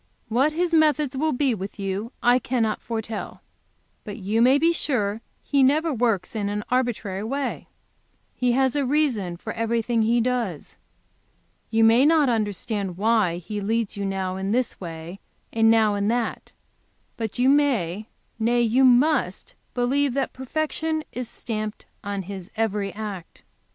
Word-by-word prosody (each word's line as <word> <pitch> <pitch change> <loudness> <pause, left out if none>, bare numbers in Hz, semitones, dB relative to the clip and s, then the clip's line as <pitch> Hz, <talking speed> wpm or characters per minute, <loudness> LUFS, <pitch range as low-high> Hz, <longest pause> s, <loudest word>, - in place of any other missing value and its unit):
"What 260 +7 +3
His 340 +1 0
methods 300 -3 +3
will 310 +4 +1
be 265 -1 +1
with 195 -1 -6
you 200 +4 -3
I 245 +1 +5
cannot 235 -4 -1
foretell. 225 -1 -5 0.6
But 205 0 -7
you 210 +2 0
may 255 +3 +6
be 330 +3 +3
sure 235 -11 0
that - - -17 0.2
He 280 -1 +2
never 300 +4 +3
works 230 -5 0
in 205 -2 -1
an 210 0 -3
arbitrary 230 -6 -1
way. 275 +5 -3 0.7
He 250 -1 +1
has 265 +1 +2
a 290 - +1
reason 250 - 0
for - - -6
everything 230 0 0
He 230 +2 +3
does. 235 - -2 0.9
You 225 0 +3
may 225 +3 +6
not 305 -2 +4
understand 205 -4 -2
why 210 -4 +2
He 205 +4 -5
leads 220 +1 -1
you 200 - -4
now 190 -1 -2
in 190 +1 -2
this 245 -2 -1
way 165 +2 -7 0.3
and 225 0 +4
now 220 -2 +4
in 200 0 0
that, 235 +1 -2 0.6
but 225 -1 -4
you 250 +1 +3
may, 225 - +2 0.3
nay, 240 +2 +2
you 240 +4 +3
must 260 +5 +3 0.2
believe 265 +2 +1
that 275 -1 -1
perfection 310 +4 -2
is 250 -1 -5
stamped 215 -2 -5 0.2
on 200 -1 -3
His 190 0 -8
every 210 -3 -1
act. 205 -5 -7
230 Hz, 155 wpm, -24 LUFS, 205-260 Hz, 0.9 s, may